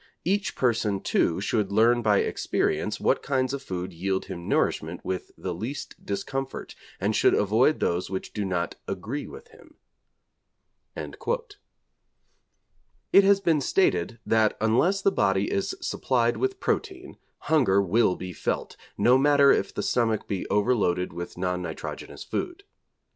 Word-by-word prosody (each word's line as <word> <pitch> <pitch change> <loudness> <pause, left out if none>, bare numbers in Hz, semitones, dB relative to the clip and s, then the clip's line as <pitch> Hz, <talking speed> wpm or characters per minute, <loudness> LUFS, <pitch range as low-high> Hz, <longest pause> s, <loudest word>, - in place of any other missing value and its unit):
Each 195 +3 0
person, 115 -5 +1
too, 85 - +1
should 100 0 0
learn 120 +3 +4
by 105 -3 +3
experience - - -1
what - - +2
kinds 130 -2 0
of 140 - -3
food 90 -8 -5
yield 95 +3 -2
him 85 0 -7
nourishment - - 0
with 95 -1 -3
the 90 - -4
least 115 - -6
discomfort, 135 +7 -4 0.3
and - - 0
should - - +4
avoid 110 +9 +3
those 85 +1 -1
which 95 0 -5
do 105 - -2
not 90 -3 -1
"agree" 110 +10 -4
with - - -12
him.' - - -19 1.2
It - - -7 2.1
has 200 0 +5
been 165 -6 +2
stated 115 - +1
that 110 -1 +2
unless 150 - +2
the 195 - +4
body 95 - +1
is 200 - -1
supplied - - 0
with 390 0 -1
protein, 375 -5 -3 0.2
hunger 125 -12 +3
will 100 +1 +2
be 90 -1 -7
felt, - - -3 0.2
no 125 +2 +5
matter 140 0 +5
if - - +1
the - - -4
stomach 115 -3 0
be 100 -3 -3
over 105 +5 +2
loaded 90 -5 0
with 85 +1 -7
non 90 0 -1
nitrogenous 90 - -7
food. 355 +3 -4
110 Hz, 145 wpm, -26 LUFS, 95-140 Hz, 2.1 s, has